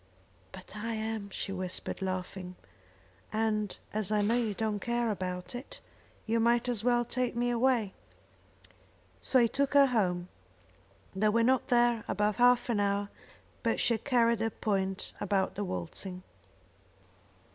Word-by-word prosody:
"But 190 +1 -11
I 225 +2 -3
am," 220 -2 -3
she 195 - -4
whispered, 185 0 -4
laughing, 185 -1 -4 0.8
"and 215 -2 0 0.2
as 215 -1 -2
I 210 -1 +2
know 215 +3 +2
you 230 -4 0
don't 215 -1 -1
care 235 0 0
about 180 -2 -4
it, 245 +3 -8 0.5
you 230 +1 +1
might 235 +1 +3
as 235 -4 -1
well 240 0 +3
take 250 0 -1
me 245 +1 +1
away." 235 -4 +2 1.3
So 265 - +2
he 240 -2 +6
took 275 +3 0
her 280 -1 +8
home. 185 -8 0 0.9
They 210 +2 +3
were 230 +2 +3
not 255 0 +2
there 240 -3 +3
above 210 0 0
half 245 0 +5
an 230 -4 +1
hour, 200 0 0 0.5
but - - 0
she 235 - +3
had 225 - -3
carried 235 -4 +3
her 225 0 +1
point 195 -3 -2
about 195 -1 +1
the 205 - -3
waltzing. 180 - -5
220 Hz, 150 wpm, -30 LUFS, 195-240 Hz, 1.3 s, her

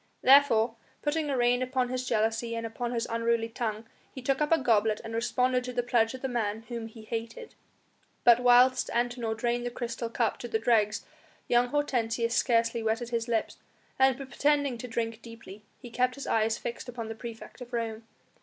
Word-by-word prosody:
Therefore, 245 -4 +5 0.3
putting 300 0 0
a 270 - 0
rein 245 +1 +3
upon 255 -1 0
his 255 0 -3
jealousy 225 +1 0
and 230 0 -3
upon 235 +1 -4
his 235 -2 -1
unruly 230 0 0
tongue, 225 -1 -4 0.3
he - - -8
took 265 +2 0
up 300 - +1
a 330 - +6
goblet 220 -5 +2
and 225 0 -7
responded 250 +2 +1
to 250 - -5
the 245 0 0
pledge 235 0 +1
of 260 - -11
the - - 0
man 225 -3 -2
whom 235 -2 -5
he 225 0 -13
hated. 230 - -6 0.7
But 240 0 +7
whilst 250 +1 +5
Antinor 240 -2 -1
drained 240 +1 -1
the 245 - -2
crystal 235 -1 -4
cup 230 -1 -1
to 240 - -5
the 225 - 0
dregs 220 -2 +1 0.4
young 240 0 +3
Hortensius 240 -4 0
scarcely 230 -1 +2
wetted 225 +2 -1
his 235 -1 -2
lips, 230 -2 -1 0.4
and 265 -1 +4
pretending 280 -1 0
to 250 - -6
drink 230 -1 -3
deeply, 230 -4 -11 0.2
he 245 -3 -11
kept 250 +1 +1
his 280 - -7
eyes 220 0 +1
fixed 240 +1 -6
upon 235 -2 -6
the 225 - -4
praefect 230 +2 -10
of 245 0 -9
Rome. 225 -1 -4
235 Hz, 190 wpm, -28 LUFS, 225-250 Hz, 0.7 s, But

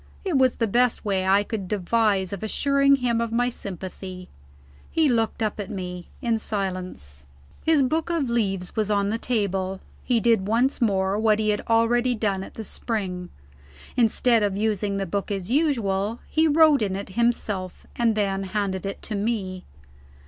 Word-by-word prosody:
It 365 -5 0
was 260 -2 +4
the 230 - +1
best 240 +2 +1
way 190 -2 0
I 200 +2 +4
could 205 -3 -4
devise 200 -1 +1
of 200 - -5
assuring 275 +5 +3
him 240 -3 0
of 230 -1 -2
my 245 +2 +2
sympathy. 185 -3 -7 0.6
He 320 -2 +2
looked 225 -2 +1
up 215 0 -2
at 200 - -4
me, 180 -2 -6
in 230 -2 +1
silence. 185 - -4 0.4
His 315 -3 +4
book 315 +6 0
of 330 -6 0
leaves 195 -6 -1
was 215 -2 0
on 200 -1 +1
the 225 +2 -1
table; 195 -5 -1 0.2
he 245 -2 +2
did 225 -4 +2
once 245 +6 +1
more, 195 -2 +1
what 215 -1 +3
he 215 0 0
had 210 -1 +1
already 240 +2 +3
done 205 -3 -1
at - - -11
the 220 - -5
spring. 190 -5 -3 0.7
Instead 235 -1 +3
of 200 -2 0
using 210 -2 0
the 195 - -1
book 200 +4 -3
as 195 0 -3
usual, 230 -8 +1
he 320 0 +2
wrote 310 -2 +5
in 195 -3 0
it 200 0 -5
himself, 205 -4 -1
and 230 -2 +2
then 195 -2 0
handed 195 -1 -2
it 195 - -6
to 220 - -5
me. 200 -3 -2
215 Hz, 175 wpm, -24 LUFS, 195-235 Hz, 0.7 s, wrote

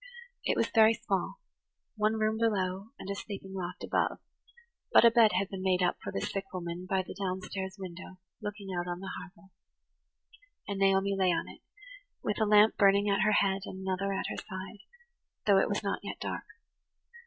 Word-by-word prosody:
It - - +1
was - - +3
very 225 0 +6
small–one 215 - -3
room 220 0 0
below, 195 -3 0
and - - -9
a 200 - -1
sleeping 195 -1 -7
loft 180 -2 -5
above; - - 0 0.7
but - - +7
a 230 - +8
bed 230 -2 +5
had 195 - 0
been 190 -1 -6
made 185 -1 +2
up 180 - +1
for - - -5
the 95 - -3
sick 195 - -3
woman 180 0 -5
by 190 -1 +1
the - - -8
down 190 -2 -2
stairs 190 0 -5
window 185 0 -8 0.2
looking 205 -1 -6
out 175 0 -2
on 175 0 -3
the 190 0 -6
harbour; 195 +1 -14 1.2
and 200 -1 -3
Naomi 195 0 +3
lay 190 -2 +3
on 170 - -1
it, - - -12 0.6
with 210 - -1
a - - +4
lamp 210 +1 +6
burning 200 +1 +5
at 195 - +2
her 215 +2 +4
head 195 0 0
and 190 - -7
another 190 +1 -1
at 195 - -2
her - - -4
side, 190 +2 -7 0.7
although 195 -2 +6
it - - 0
was 205 - -1
not 200 - -1
yet - - -6
dark. - - -4
195 Hz, 190 wpm, -30 LUFS, 185-205 Hz, 1.2 s, a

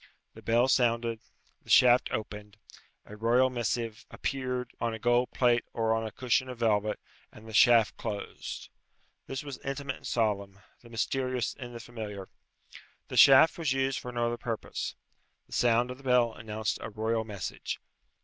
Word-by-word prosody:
The - - -13
bell 120 +3 +3
sounded, 115 -3 +2 0.4
the - - -19
shaft 125 0 +6
opened, 105 -1 -5 0.5
a 105 - -11
royal 120 +4 +3
missive 115 -2 -2
appeared 125 -2 -3
on 115 -1 -1
a - - -5
gold 120 +2 +2
plate 120 -2 +2
or 115 -1 +1
on 115 0 -1
a - - -7
cushion 130 +3 0
of 125 - -7
velvet, 105 -2 +1 0.3
and 110 +1 -14
the 110 - -9
shaft 115 0 +5
closed. 105 -3 -6 0.6
This 135 +2 -4
was 140 -3 -7
intimate 140 -1 -4
and - - -10
solemn, 100 -4 -1 0.2
the 120 - -15
mysterious 125 -1 -1
in 120 -2 -9
the 120 - -7
familiar. 105 -4 -7 0.8
The - - -4
shaft 140 +5 +7
was 155 -5 +1
used 135 0 0
for 125 - -7
no 120 -1 -1
other 120 0 -1
purpose. 115 -1 -4 0.5
The - - -14
sound 120 +1 +2
of 125 - -9
the - - -16
bell 125 -3 +3
announced 110 -2 -3
a - - -5
royal 110 +1 -1
message. 105 -4 -5
120 Hz, 170 wpm, -29 LUFS, 110-125 Hz, 0.8 s, shaft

